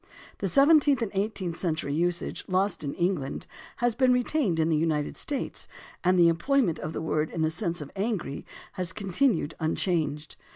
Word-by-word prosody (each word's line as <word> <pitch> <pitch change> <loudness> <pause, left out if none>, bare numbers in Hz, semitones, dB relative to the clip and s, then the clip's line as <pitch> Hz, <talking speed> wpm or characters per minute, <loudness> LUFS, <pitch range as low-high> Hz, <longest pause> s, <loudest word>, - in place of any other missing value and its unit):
The - - -1
seventeenth 285 -3 +5
and 220 - -3
eighteenth 195 -4 -2
century 155 -5 -2
usage, 175 +3 -1
lost 190 0 0
in 140 - -3
England, 170 -6 -1 0.3
has 240 -2 +1
been 255 +2 +3
retained 250 - +1
in 160 0 +2
the 160 - +3
United 155 -1 0
States, 280 -3 -4 0.4
and 180 +1 +3
the 170 -1 +6
employment 170 - +2
of 155 - -5
the - - -4
word 155 -1 0
in 160 - -2
the 155 - +1
sense 170 -1 -2
of 145 - -8
angry 200 -8 -2 0.3
has 180 -3 -1
continued 195 - +1
michanged. 155 -2 -1
175 Hz, 170 wpm, -27 LUFS, 160-220 Hz, 0.4 s, the